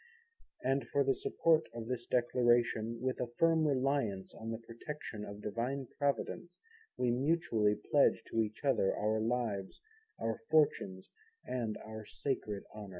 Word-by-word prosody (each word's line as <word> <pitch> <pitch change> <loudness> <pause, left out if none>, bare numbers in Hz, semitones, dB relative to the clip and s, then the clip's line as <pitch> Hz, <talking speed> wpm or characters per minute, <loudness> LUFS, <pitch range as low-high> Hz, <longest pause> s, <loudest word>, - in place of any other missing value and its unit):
And 135 +2 +1
for 140 - +2
the 135 0 +3
support 160 +3 +2
of 115 -1 -4
this 120 0 -4
Declaration, 120 -2 +2
with 130 0 -1
a 125 - 0
firm 165 -1 +4
reliance 130 -8 0
on 110 - -7
the 115 - -2
Protection 115 0 -7
of 105 0 -8
Divine 125 +6 -2
Providence, 145 +4 -1 0.4
we 125 -1 +2
mutually 120 -6 +2
pledge - - +3
to 115 - +2
each 110 +5 -4
other 130 -8 +3
our 110 +1 +1
Lives, 110 -4 -1 0.4
our 115 -1 -1
Fortunes 140 -12 +2 0.3
and 115 -4 -2
our 110 0 -7
sacred 105 -7 -3
120 Hz, 140 wpm, -34 LUFS, 110-135 Hz, 0.4 s, firm